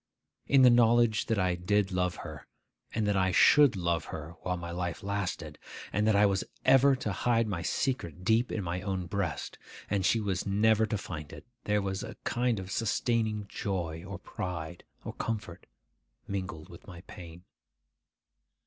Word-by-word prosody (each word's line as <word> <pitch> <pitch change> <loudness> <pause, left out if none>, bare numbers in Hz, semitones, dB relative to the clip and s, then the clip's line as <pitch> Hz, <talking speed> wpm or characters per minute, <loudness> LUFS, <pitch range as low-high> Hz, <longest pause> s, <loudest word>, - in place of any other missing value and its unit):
In 135 -1 +5
the 125 - +8
knowledge 120 -2 +4
that 115 - +1
I 90 -2 +2
did 95 +3 0
love 90 -1 0
her, 75 -3 -9 0.4
and 110 -1 -1
that 105 -1 +1
I 95 -1 +2
should 145 +4 +6
love 85 -3 -1
her 80 +1 -7
while 90 -1 -2
my 85 0 -6
life 85 0 -4
lasted, 100 -1 -3 0.3
and 105 +1 +1
that 110 - +4
I 105 +1 +5
was 100 -1 +1 0.2
ever 135 +1 +6
to 125 -5 -3
hide 115 +3 +1
my 90 -5 -3
secret 90 - -2
deep 115 +5 +2
in 105 - -2
my 90 +1 -3
own 95 -2 -3
breast, 100 +2 -3 0.3
and 100 -2 +1
she 115 +5 +3
was 100 -4 -1
never 110 +2 +3
to 105 - -1
find 75 -6 -7
it, - - -11 0.2
there 105 -1 +1
was 95 -1 -2
a - - -8
kind 120 -3 0
of 95 0 -7
sustaining 110 -1 0
joy 85 -5 -3
or 95 0 -7
pride, 85 -2 -6 0.2
or - - -5
comfort, 105 -6 -5 0.6
mingled 95 -5 -5
with - - -14
my 85 -2 -10
pain. 90 -3 -11
100 Hz, 175 wpm, -30 LUFS, 90-110 Hz, 0.6 s, the